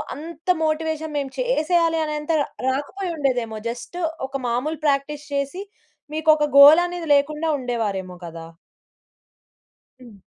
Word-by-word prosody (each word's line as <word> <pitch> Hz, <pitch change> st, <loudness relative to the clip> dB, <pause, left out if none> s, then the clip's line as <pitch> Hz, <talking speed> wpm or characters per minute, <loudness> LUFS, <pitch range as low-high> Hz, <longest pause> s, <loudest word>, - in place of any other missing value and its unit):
అంత 330 Hz, +3 st, -10 dB, 0.2 s
మోటివేషన్ 315 Hz, 0 st, -2 dB
మేము 275 Hz, -2 st, -3 dB
చేసేయాలి 340 Hz, -9 st, +1 dB
అనే 305 Hz, 0 st, -3 dB
అంత 300 Hz, -, -3 dB
ర -, -, 0 dB, 0.2 s
రాకపోయిండేదేమో. 275 Hz, -, -2 dB
జస్ట్ 245 Hz, +8 st, -7 dB, 0.3 s
ఒక 270 Hz, -, -27 dB
మామూలు 265 Hz, +6 st, -2 dB
ప్రాక్టీస్ 290 Hz, +1 st, 0 dB
చేసి, 280 Hz, +7 st, -2 dB, 0.5 s
మీకు 315 Hz, +1 st, -1 dB
ఒక 300 Hz, 0 st, +1 dB
గోల్ 295 Hz, +4 st, +10 dB
అనేది 350 Hz, -2 st, -6 dB
లేకుండా 300 Hz, +3 st, 0 dB
ఉండేవారేమో 205 Hz, -7 st, -3 dB
కదా! 165 Hz, 0 st, -9 dB, 1.5 s
హ్మ్. 235 Hz, -5 st, -14 dB
295 Hz, 120 wpm, -22 LUFS, 255-320 Hz, 1.5 s, గోల్